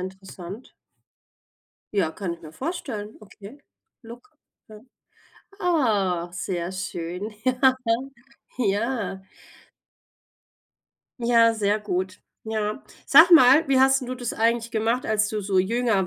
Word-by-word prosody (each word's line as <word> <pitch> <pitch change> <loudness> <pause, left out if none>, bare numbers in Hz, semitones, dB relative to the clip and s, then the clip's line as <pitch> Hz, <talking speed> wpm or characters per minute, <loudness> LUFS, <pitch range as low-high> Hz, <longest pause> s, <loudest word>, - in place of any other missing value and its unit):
interessant. 190 +3 -9 1.2
Ja, 190 -6 +1
kann 175 0 -5
ich 170 - -20
mir 155 -1 -11
vorstellen, 230 - -6
okay, 210 +4 -14 0.4
look, 240 +6 -13 0.4
ja. 215 -1 -13 0.8
Ah, 205 - 0
sehr 180 -1 -4
schön. 185 +2 -5
Ja. 255 +1 +3 0.8
Ja. 205 -3 -1 2.0
Ja, 230 -1 +4
sehr 210 -1 0
gut. 185 -2 -3 0.2
Ja. 215 +1 -3 0.2
Sag 345 +2 +7
mal, 295 -1 +7
wie 270 -1 +3
hast 265 +1 +4
'n 250 - -6
du 255 - -4
das 245 -2 -5
eigentlich 230 +1 0
gemacht, 225 +3 -1
als 215 -1 +1
du 215 -1 -3
so 195 -1 0
jünger 210 -1 +1
215 Hz, 115 wpm, -24 LUFS, 190-245 Hz, 2.0 s, Sag